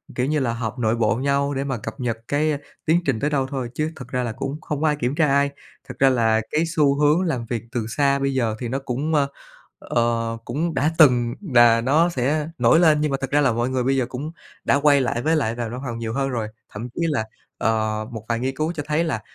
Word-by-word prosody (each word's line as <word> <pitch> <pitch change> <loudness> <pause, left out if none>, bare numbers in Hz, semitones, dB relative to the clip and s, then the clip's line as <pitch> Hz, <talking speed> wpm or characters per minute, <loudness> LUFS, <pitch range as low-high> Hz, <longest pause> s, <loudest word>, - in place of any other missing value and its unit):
kiểu 125 - 0
như 150 +2 +1
là, 125 -4 0
họp 115 +1 -4
nội 110 -1 +1
bộ 115 -3 +1
nhau 140 +2 0
để 135 0 -2
mà 135 -3 -2
cập 110 +1 -7
nhật 120 -3 -2
cái 150 +2 +1 0.3
tiến 165 +2 +4
trình 135 -6 0
tới 145 - 0
đâu 135 -3 0
thôi, 130 -3 -4
chứ 155 +3 -2
thực 130 -5 -9
ra 125 0 -2
là 120 - -2
cũng 140 +7 -5
không 150 -1 -4
có 160 - +3
ai 150 - +2
kiểm 130 -1 -2
tra 155 -1 +3
ai. 140 0 +3 0.4
Thật 125 - -6
ra 135 - +6
là 115 -3 +2
cái 155 +2 +2
xu 150 -4 +2
hướng 150 +4 +4
làm 135 -10 -1
việc 115 -1 -3
từ 120 -4 -2
xa 140 +3 +1
bây 135 0 0
giờ 115 -4 0
thì 120 - -3
nó 130 +4 -2
cũng, 135 +4 -3 0.7
ờ, 115 -1 -1
cũng 160 +7 -2
đã 155 +2 +1
từng 125 -6 +5 0.2
là 120 -1 +6
nó 150 +8 +3
sẽ 150 +1 -1
nổi 165 - +5
lên, 155 -3 +4
nhưng 150 -1 0
mà 135 - 0
thực 135 - -3
ra 145 +1 +3
là 135 -3 +3
mọi 120 +2 -1
người 130 -1 0
bây 135 +2 +1
giờ 130 - +1
cũng 140 +6 -5 0.3
đã - - +3
quay 145 -1 +4
lại 120 -2 -1
với 160 +5 +2
lại 115 -7 0
vào 120 -1 -3
văn 125 +3 -6
phòng 115 -2 -4
nhiều 115 -1 -3
hơn 135 +1 0
rồi. 115 -4 -2 0.3
Thậm 115 +4 -6
chí - - -3
là, 140 -8 0 0.3
ờ, 110 -1 0
một 110 -2 -7
vài 115 -1 0
nghiên 130 +2 -2
cứu 155 +4 -1
cho 150 -3 -4
thấy 155 +2 +1
là, 150 -10 -2
130 Hz, 260 wpm, -22 LUFS, 120-150 Hz, 0.7 s, ra